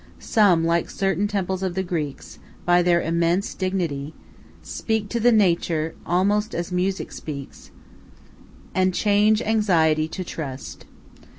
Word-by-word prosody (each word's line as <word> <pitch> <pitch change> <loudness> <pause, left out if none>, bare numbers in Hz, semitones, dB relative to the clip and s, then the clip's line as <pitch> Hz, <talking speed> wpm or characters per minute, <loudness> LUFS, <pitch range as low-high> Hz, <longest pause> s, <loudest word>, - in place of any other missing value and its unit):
Some, 185 -7 +3
like 170 0 +1
certain 195 0 0
temples 190 -2 -2
of 185 -2 -2
the 190 - 0
Greeks, 155 -6 -5 0.3
by 175 0 +4
their 175 -1 +3
immense 170 +3 0
dignity, 165 -6 -3 0.5
speak 220 -2 -2
to 235 - -1
the 240 +2 +4
nature 170 -6 +2
almost 200 +5 +1
as 170 +1 -3
music 185 +2 -1
speaks, 140 -3 -8 1.0
and 185 -1 +1
change 210 +1 +3
anxiety 165 -8 +2
to 185 +3 -5
trust. 140 -6 -7
180 Hz, 125 wpm, -23 LUFS, 165-200 Hz, 1.0 s, by